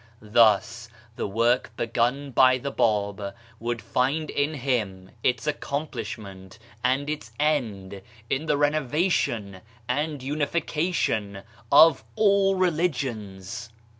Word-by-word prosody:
Thus, 115 +1 +3 0.3
the - - -3
work 115 +3 +1
begun 120 +5 -1
by 130 +1 +5
the 140 +2 -4
Bab 100 -4 0 0.2
would 120 0 -3
find 145 +5 0
in 145 +2 0
him 105 -9 -2
its 125 +1 0
accomplish 145 -1 -3
ment 95 -2 -12 0.3
and 130 +3 +1
its 150 -7 -5
end 110 -11 -1 0.3
in 140 +7 -2
the 150 -1 +2
renovation 145 - 0 0.3
and 145 +2 -2
unification 150 - -1 0.3
of 145 -4 +7
all 200 -2 +3
religions 120 - -2
125 Hz, 105 wpm, -25 LUFS, 110-150 Hz, 0.3 s, of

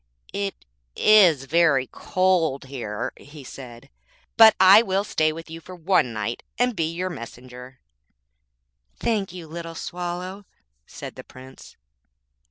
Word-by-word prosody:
'It 200 - -4 0.3
is 180 -10 +5
very 150 -3 +3
cold 175 -5 0
here,' 120 -6 -5
he 145 0 -13
said 120 -2 -11 0.5
'but 220 -1 +8
I 190 +3 +8
will 195 -3 -1
stay 155 -6 0
with 165 +1 -9
you 165 0 -9
for 185 +3 -11
one 175 -7 +1
night, 110 +1 -4 0.2
and 245 -1 +1
be 160 -2 -1
your 180 +2 -3
messenger.' 125 0 -11 1.2
'Thank 210 -6 -1
you, 180 -2 -9
little 165 +1 -8
Swallow,' 180 +3 -6 0.4
said - - -9
the - - -11
Prince. 130 +1 -15
165 Hz, 130 wpm, -23 LUFS, 130-185 Hz, 1.2 s, but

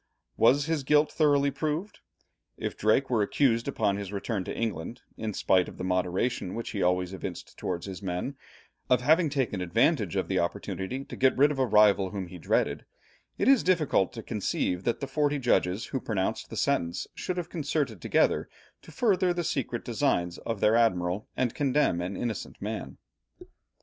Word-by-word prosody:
Was 135 +5 +4
his 160 -2 0
guilt 150 +2 +3
thoroughly 145 -2 +3
proved? 160 +8 -3 0.6
If - - -4
Drake 120 +6 +2
were 115 -3 +3
accused 115 +2 +2
upon 105 -7 0
his 100 -1 -5
return 100 0 -2
to - - -5
England 110 -1 -3
in 110 -1 -3
spite 90 -1 +2
of - - -13
the - - -5
moderation 90 +3 -1
which 115 - -4
he 105 -3 -3
always 90 +1 +1
evinced 95 - -7
towards 85 -2 -4
his 95 -3 -7
men, 95 +8 -3 0.5
of 125 -1 +4
having 160 +5 +4
taken 130 -9 -1
advantage 110 - +1
of - - 0
the - - 0
opportunity 95 +8 -3
to - - -8
get 130 0 +3
rid 145 +3 +5
of 140 - -4
a 130 - +2
rival 105 -3 +5
whom 100 -2 -4
he 90 - -10
dreaded, - - 0 0.5
it - - 0
is 270 -3 +6
difficult 160 - +2
to 115 -2 -7
conceive 95 -4 -2
that 120 - 0
the 140 - -2
forty 145 +1 +1
judges 100 -6 +1
who 135 - -3
pronounced 110 +1 -2
the - - -7
sentence 90 -12 0
should 180 - -4
have 175 -1 -4
concerted 145 - -2
together - - +2 0.3
to - - -14
further 185 -1 +2
the 175 - -1
secret 135 -7 -2
designs 105 -8 0
of 115 -3 -4
their 110 +1 +4
admiral 95 -4 +1
and 125 -3 0
condemn 140 -10 +1
an 90 +3 -4
innocent 115 -4 -4
man. - - -5
115 Hz, 180 wpm, -28 LUFS, 95-145 Hz, 0.6 s, is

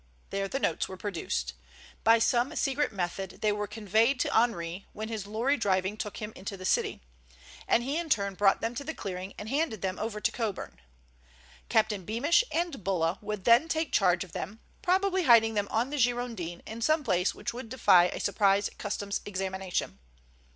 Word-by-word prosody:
There 195 0 -1
the 265 - -2
notes 165 - 0
were 190 - -7
produced. 165 - -3 0.5
By 225 +1 +6
some 245 +5 +1
secret 285 -1 0
method 190 -1 -4
they 215 - +3
were 210 0 -2
conveyed 220 +5 +1
to - - 0
Henri 185 -6 0
when 220 +1 -5
his 215 -3 -4
lorry 235 +7 +1
driving 190 -2 +1
took 210 -1 -5
him 215 0 -6
into 195 +1 -6
the 185 - -8
city, - - +1 0.7
and 235 - +3
he 275 +5 -1
in 340 -2 -5
turn 200 -7 +1
brought 195 +1 +3
them 225 +1 -1
to 255 - -5
the 320 +3 -5
clearing 185 0 -6
and 210 - -7
handed 275 - -1
them 185 0 -2
over 215 -1 -3
to - - +1
Coburn. 205 - -4 0.9
Captain 215 -3 +2
Beamish 255 - +3
and 335 - -2
Bulla 175 -2 0
would 210 -2 -4
then 235 - +5
take 320 -2 -1
charge 180 -2 +3
of 185 - -13
them, 210 +7 -6 0.2
probably 375 0 +2
hiding 225 -3 +6
them 205 -1 0
on 235 +5 0
the 295 - -2
Girondin 235 -8 -1
in 225 +1 -7
some 310 +5 +2
place 180 -6 +1
which - - -4
would 240 -1 -7
defy 200 -8 +5
a - - -3
surprise 200 0 +2
Customs 205 -1 -3
examination. 190 - -3
215 Hz, 185 wpm, -29 LUFS, 190-245 Hz, 0.9 s, By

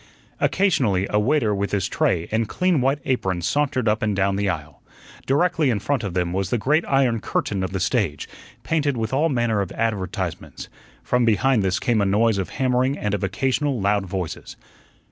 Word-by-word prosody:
Occasionally 120 - +2
a 105 - +3
waiter 115 -1 +2
with 100 0 -2
his 100 -3 0
tray 85 - 0
and 110 0 0
clean 180 -6 +1
white 135 +3 +2
apron 95 -9 -1
sauntered 135 - 0
up 105 +1 +1
and 105 -2 0
doun 100 0 +1
the 100 0 0
aisle. 80 -4 -5 0.5
Directly 160 +1 +2
in 115 - +1
front 130 +3 -1
of 95 -4 -4
them 90 -1 0
was 95 -1 -1
the 120 - +1
great 150 +9 +2
iron 130 -4 +2
curtain 100 -1 -2
of 95 - -3
the 95 - -2
stage, 95 - -1 0.4
painted 145 -5 0
with 110 +2 -3
all 155 +5 +2
manner 120 -6 +1
of 95 - -4
advertisements. 105 -6 -3 0.3
From 125 0 +1
behind 115 +2 +3
this 95 -1 0
came 115 -3 +1
a - - +2
noise 105 +1 +2
of 95 - -3
hammering 130 +1 0
and 105 -1 -2
of 100 - -2
occasional 130 +7 0
loud 100 0 +1
voices. 90 -2 -5
110 Hz, 190 wpm, -22 LUFS, 95-130 Hz, 0.5 s, a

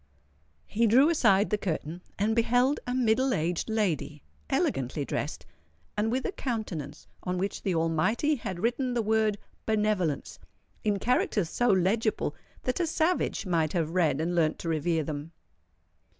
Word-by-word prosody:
He 230 +2 +1
drew 260 +8 +6
aside 200 - +3
the 210 - +1
curtain, 170 -2 -3 0.2
and 215 +2 +1
beheld 245 +4 +3
a 245 - -1
middle 255 +1 +2
aged 170 +6 -1
lady, 170 -9 -1 0.3
elegantly 135 +2 0
dressed, 140 - -4 0.5
and 215 +2 0
with 260 +2 -1
a - - 0
countenance 205 - -4 0.2
on 180 0 -2
which 195 +2 -2
the 190 -3 -1
Almighty 165 - +1
had 190 -6 -5
written 245 +4 0
the 235 - +1
word 215 -1 +2 0.3
"Benevolence" 210 -8 0 0.4
in 210 -2 +1
characters 205 -5 +1
so 245 - +1
legible, 205 +2 +1 0.3
that 255 - -1
a 345 - +1
savage 320 -5 0
might 165 -4 +1
have 165 -3 0
read 165 -5 +2
and 170 +3 -1
learnt 160 -3 +2
to 165 - -4
revere 160 0 +1
them. 150 +2 -6
200 Hz, 150 wpm, -28 LUFS, 165-230 Hz, 0.5 s, drew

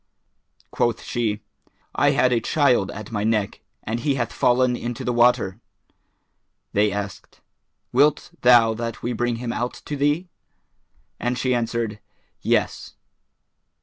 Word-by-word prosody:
Quoth 120 -1 0
she, 110 -3 -2 0.5
"I - - +3
had 125 -1 +3
a 120 - +3
child 125 -6 +2
at 110 +1 -8
my 105 -2 -2
neck, 110 -2 0 0.2
and 115 +2 -3
he 140 +3 0
hath 120 -3 -2
fallen 125 0 +3
into 120 -1 -5
the 125 - 0
water." 120 -5 +3 1.1
They 105 +1 +3
asked, 100 -1 -6 0.5
"Wilt 145 +4 +3
thou 120 -2 +6
that 115 0 -5
we 120 - -1
bring 120 +1 -1
him 115 0 -4
out 120 +1 -2
to 150 - -4
thee?" 145 +5 +1 0.9
and 125 0 -1
she 130 0 +1
answered, 115 -2 -2 0.4
"Yes." - - -1
120 Hz, 135 wpm, -23 LUFS, 110-125 Hz, 1.1 s, thou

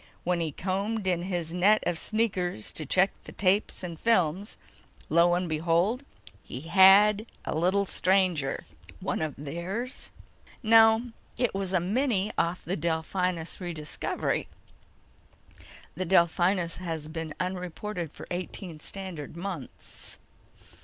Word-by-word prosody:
When 175 0 +1
he 165 -2 -1
combed 195 +6 -2
in 180 -2 +1
his 175 -3 -3
net 200 +4 +4
of 175 -2 -1
sneakers 185 - -1
to 155 - -4
check 190 +6 +4
the - - -9
tapes 195 +1 +1
and 170 -3 -6
films, 195 -3 +1 0.5
lo 170 +1 +5
and 180 0 -1
behold, 170 - +1 0.4
he 125 - -8
had 200 +5 +6 0.2
a - - -2
little 185 +5 +2
stranger." 180 -7 +1 0.4
"One - - -2
of 155 -2 -2
theirs?" 175 - -4 0.5
"No. 225 +1 +6 0.3
It 245 -2 +1
was 195 -1 -3
a 185 - +3
mini 210 +2 0
off 170 +2 -1
the 180 - -1
Delphinus 170 +2 -2
Rediscovery. 160 -4 -2 1.5
The 185 +3 -3
Delphinus 175 0 +3
has 165 -4 -4
been 160 0 -5
unreported 180 -1 -4
for - - -10
eighteen 175 -2 -5
standard 170 -4 -7
months!" 175 -7 -8
180 Hz, 125 wpm, -28 LUFS, 165-200 Hz, 1.5 s, had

